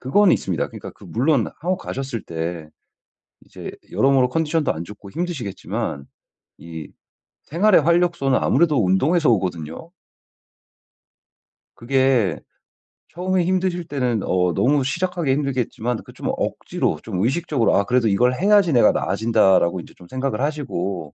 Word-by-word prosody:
그거는 180 +9 +4
있습니다. 90 -5 -2
그니까 - - -9
그 - - -17
물론 130 0 +1
한국 180 +3 0
가셨을 135 -5 -5
때 80 -1 -5 0.8
이제 - - -9 0.2
여러모로 135 -2 +3
컨디션도 160 +1 0
안 80 +1 -5
좋고 100 +1 -12
힘드시겠지만 130 - -4 0.5
이 80 -2 -9 0.6
생활의 180 +1 +3
활력소는 170 -5 +2
아무래도 145 - +2
운동에서 145 - +2
오거든요. 90 - -2 1.9
그게 130 -4 +1 0.8
처음에 185 +1 0
힘드실 180 -2 0
때는 125 -6 -1
어 90 -1 +1
너무 135 - +2
시작하기 170 +1 -1
힘들겠지만 125 -4 -1
그 - - -14
좀 - - -6
억지로 - - -2
좀 90 +2 -2
의식적으로 135 - +1
'아 100 - +3
그래도 125 -1 +2
이걸 120 +5 +3
해야지 195 -3 +4
내가 120 -3 +5
나아진다.'라고 95 -6 +2
이제 - - -15
좀 90 - -15
생각을 130 -1 -3
하시고 100 - -3
130 Hz, 330 characters per minute, -21 LUFS, 100-160 Hz, 1.9 s, 내가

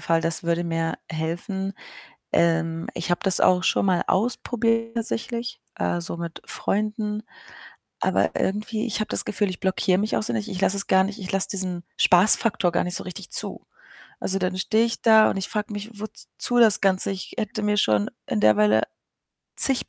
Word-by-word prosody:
Fall, 165 0 +1
das 165 0 -1
würde 170 0 -1
mir 165 -1 -2
helfen. 175 +5 -4 0.6
Ähm, 165 -1 +1
ich 175 - -4
habe 175 - +1
das 190 -2 +3
auch 180 0 +4
schon - - +2
mal 185 -2 +2
ausprobiert 230 +2 0
tatsächlich, 235 +1 -4 0.2
äh, 85 0 -1
so 85 - -5
mit 170 -1 -7
Freunden, 210 0 -2 0.8
aber - - +1
irgendwie, 215 +3 -2
ich 225 - -2
habe 215 - -2
das - - +1
Gefühl, 205 -1 -1
ich 180 - -8
blockiere 190 -1 +1
mich 210 +2 -1
auch - - 0
sehr 220 - -2
nicht. 220 -1 -3
Ich 185 - -5
lasse 195 0 +2
es 200 - -1
gar 190 0 +4
nicht 200 +3 -5
ich 185 -3 -6
lasse 195 0 +1
diesen 185 -3 -3
Spaßfaktor 195 0 +5
gar - - +1
nicht 180 0 +1
so - - -4
richtig 185 0 -8
zu. - - 0 0.5
Also, 195 - 0
dann 185 0 -2
stehe 220 +4 +2
ich 235 - -3
da 220 -2 +6
und - - -2
ich 190 - -2
frag 210 -1 -3
mich: 205 +1 -7
„Wozu 220 +3 -2
das 225 -4 +6
Ganze? 190 -1 +2
Ich 190 -1 -7
hätte 215 -1 -3
mir 210 0 0
schon 105 - +2 0.2
in 110 - -1
der 105 0 +5
Weile 105 +1 +3 0.7
zig 270 -2 +4
195 Hz, 195 wpm, -24 LUFS, 175-215 Hz, 0.8 s, da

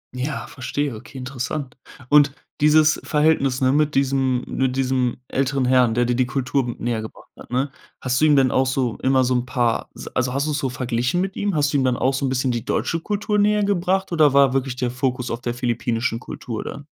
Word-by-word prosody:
Ja, 135 +3 -3
verstehe. 140 0 -3
Okay, 120 +5 -11
interessant. 130 +1 -5 0.3
Und 145 -1 +5 0.3
dieses 155 +1 +4
Verhältnis, 150 -4 +1
ne, 130 0 +3
mit 150 0 +1
diesem 135 -2 +1
mit 130 -1 -1
diesem 130 -2 0
älteren 135 0 0
Herrn, 125 -3 +3
der 120 - +2
dir 120 0 0
die 125 0 +1
Kultur 130 -2 -1
näher 115 -2 -2
gebracht 110 - -11
hat, - - -14
ne? 130 +3 -1 0.3
Hast 130 +2 -1
du - - +5
ihm 150 -2 +5
denn 130 -2 +4
auch 130 0 +2
so 130 -3 -1
immer 130 0 +3
so 125 +1 +1
'n 125 0 -1
paar 120 -3 0
s - - -9
also, 125 0 -1
hast 140 +2 0
du's 150 -1 -1
so 135 - -1
verglichen 125 +5 -1
mit 190 +1 -2
ihm? 205 -3 -1
Hast 145 -1 +1
du - - +3
ihm 135 - +1
dann 125 -1 +1
auch 130 - +1
so 135 +1 -1
'n - - -1
bisschen 130 0 0
die 120 -2 -3
deutsche 165 +5 -1
Kultur 210 +3 -1
näher 210 0 +3
gebracht 190 -1 0
oder 155 -4 +4
war 140 -2 +5
wirklich 135 -1 -1
der 125 -1 -2
Fokus 125 -1 -2
auf 115 - -4
der 120 -1 -3
philippinischen 120 -1 -1
Kultur 115 -3 -6
dann? 140 - -8
130 Hz, 220 wpm, -22 LUFS, 125-145 Hz, 0.3 s, Und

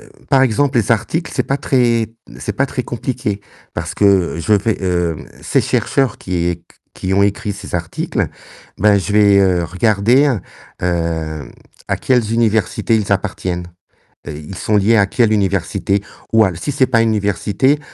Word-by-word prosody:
heu, - - -16 0.2
par 135 -1 +4
exemple, 130 +2 +2
les 115 +1 +2
articles, 160 +10 -1
c'est - - +1
pas 135 - -1
très 120 -5 +1 0.3
c'est - - -3
pas 140 - 0
très 125 - -3
compliqué. 120 -4 -3 0.3
Parce - - -4
que 95 -5 +3
je 85 +6 0
vais, 105 +2 +3
hem, 85 -3 0
heu, - - -12 0.2
ces - - +2
chercheurs 135 -5 0
qui 90 -2 -2
é 85 - -1
q 85 - -27 0.3
qui 95 +1 -2
ont 100 - +4
écrit 100 +1 0
ces 100 -2 -9
articles, 85 -2 -2 0.5
bah 105 -1 +4
je 100 +2 -3
vais, 100 -1 +5
heu, 90 -3 +2
regarder, 110 - +2 0.4
hem, 80 -4 -2 0.4
à - - +1
quelles 120 -4 +1
universités 115 0 +1
ils 105 -2 0
appartiennent. 90 -2 -2 0.6
Heu, - - -4
ils 75 +5 -9
sont 105 +3 +1
liés 105 +3 +3
à 100 - +5
quelle 110 0 +2
université, 100 0 0 0.3
ou 110 -1 +6
al 90 -4 -2
si 145 - -3
c'est 135 -2 +2
pas 115 -3 +3
une 115 - +2
université, 105 - +1
105 Hz, 175 wpm, -17 LUFS, 95-115 Hz, 0.6 s, ou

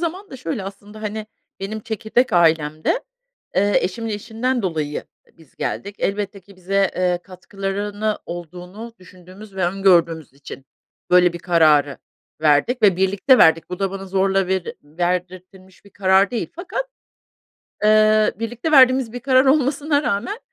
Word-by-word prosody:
zaman 365 +4 -4
da - - -8
şöyle 245 -4 -4
aslında, 205 +2 -10
hani, 215 0 -5 0.3
benim 215 +3 -5
çekirdek 220 +3 -1
ailemde, 160 - +2 0.5
eee, 205 +2 +3
eşimin 225 +5 -4
işinden 230 +3 -2
dolayı 155 -5 -2
ı - - -29
biz 160 -5 -21
geldik. 200 +1 -4
Elbette 200 0 -3
ki 195 +1 -19
bize, 195 +1 0
eee, 180 -1 +1
katkılarını 200 +3 -4
olduğunu 180 +6 -9
düşündüğümüz 185 +3 -15
ve 185 - 0
öngördüğümüz 175 -5 +2
için 135 -1 -11 0.5
böyle 180 -1 +5
bir 175 - -7
kararı 155 -5 +3 0.4
verdik 155 - +2
ve 195 -4 +5
birlikte 200 +8 +3
verdik. 160 +2 +4
Bu 180 - -5
da 195 -1 -1
bana 195 0 -7
zorla 195 0 +1
veri 190 -1 -2
verdirtilmiş 180 +4 -5
bir 200 - -18
karar 190 0 +3
değil 240 -2 -3
fakat, 365 +8 -4 1.0
eee, 215 0 +4
birlikte 240 +7 -3
verdiğimiz 255 -4 +5
bir 245 - -5
karar 260 +1 +3
olmasına 285 +1 +2
rağmen, 250 - -2
195 Hz, 145 wpm, -20 LUFS, 180-220 Hz, 1.0 s, böyle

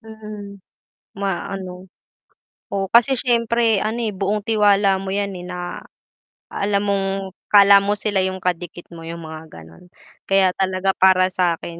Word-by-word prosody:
Mm, 215 -2 -10 0.6
maano, 190 -1 -5 0.8
oo 195 -1 -1
kasi 240 +4 +4
siyempre 235 -3 +1
ano 220 +2 -2
eh, 220 -4 -2
buong 200 +2 -1
tiwala 205 -3 +3
mo 190 - -5
yan 200 -1 -2
eh, 175 - -8
na, 180 -1 -6 0.7
alam 200 0 0
mong 200 -1 0 0.5
akala 200 -1 +8
mo 205 +1 +1
sila 205 -1 -1
yung 190 0 -3
kadikit 175 -1 -4
mo 165 - -10
yung 170 0 -7
mga 160 0 -9
ganon. 80 - -14 0.4
Kaya 195 -1 +3
talaga 190 0 0
para 185 -1 +4
sakin 170 -2 -2
195 Hz, 140 wpm, -20 LUFS, 180-205 Hz, 0.8 s, akala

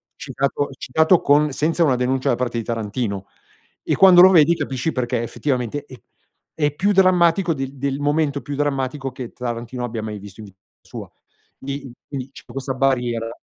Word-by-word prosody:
citato 140 +1 -2
citato 160 +6 +2
con 145 +1 +3
senza 160 +5 +1
una 140 -5 +3
denuncia 130 +1 0
da - - +3
parte 120 -1 -3
di 115 - -2
Tarantino 105 -3 -3 0.6
e - - 0
quando 185 -2 +8
lo 185 - +9
vedi 170 -1 +5
capisci 135 +1 -2
perché 125 -3 -2
effettivamente 130 +2 -3
è 130 -3 -13 0.6
è 150 -2 +1
più 200 +7 +1
drammatico 180 -2 +3
del 135 -1 -5
del 140 +1 -2
momento 145 -1 0
più 145 +3 -6
drammatico 135 -1 -2
che 125 -2 -8
Tarantino 120 0 -5
abbia 115 -2 -4
mai 105 -1 -6
visto 100 0 -12
in - - -9
vita 95 -1 -19 0.2
sua. - - -10 0.5
Quindi- 140 -1 -6 0.2
quindi 135 -2 -6
c'è - - -13
questa 135 0 -5
barriera. 120 -3 0
135 Hz, 175 wpm, -21 LUFS, 120-150 Hz, 0.6 s, lo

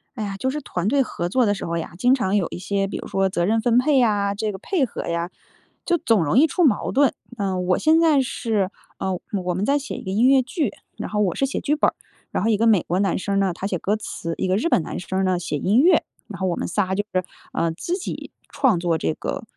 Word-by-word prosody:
哎 220 - -3
呀， 200 -1 -4
就 260 +7 -1
是 300 - -2
团 180 -8 -3
队 270 +4 +3
合 175 -7 -4
作 250 +4 +3
的 205 - +2
时 195 - -5
候 170 0 -2
呀， 165 - -5
经 250 +6 +4
常 205 -6 0
有 195 -5 +2
一 - - -6
些 195 +2 -1
比 195 - -5
如 - - -7
说 195 0 +1
责 175 -2 0
任 225 +3 +2
分 240 0 +3
配 280 +2 +4
呀， 205 -4 +2
这 210 +1 -2
个 195 - -7
配 295 - 0
合 240 - -6
呀， 170 +1 -2 0.6
就 345 - +2
总 225 - +2
容 145 +9 +1
易 315 - +6
出 355 +4 0
矛 255 -10 +2
盾。 280 0 +3 0.2
呃， 190 -3 -1
我 180 0 +1
现 320 +1 +4
在 320 -4 +4
是 220 -6 -1 0.3
呃， 190 -2 -2 0.2
我 180 0 -1
们 185 +3 -2
在 280 +4 +3
写 285 0 -5
一 - - -7
个 - - -5
音 215 +6 +3
乐 270 0 +6
剧， 255 - -2 0.3
然 - - -5
后 210 - -1
我 190 -5 +1
是 275 - +1
写 270 - -2
剧 295 - 0
本 305 - +3
儿， - - -16 0.4
然 - - -1
后 225 - +2
一 215 - +3
个 225 - +2
美 215 -6 +5
国 180 +4 -1
男 195 -3 +1
生 195 +2 0
呢 195 -2 +1
他 190 +3 -4
写 190 - -1
歌 200 +5 0
词， 165 -5 -5
一 - - -1
个 185 - +2
日 235 +12 0
本 - - +3
男 - - -5
生 190 +2 -2
呢 185 -1 +2
写 170 -4 -3
音 205 - +3
乐。 355 +5 +5 0.2
然 - - -8
后 190 - +1
我 175 - 0
们 - - -2
仨 190 0 0
就 205 +2 -1
是， 185 0 +1 0.3
呃， 165 0 0
自 340 - -3
己 385 - -6 0.2
创 245 -10 +2
作 170 -2 +1
这 80 - -1
个 - - -5
205 Hz, 295 characters per minute, -22 LUFS, 185-255 Hz, 0.6 s, 易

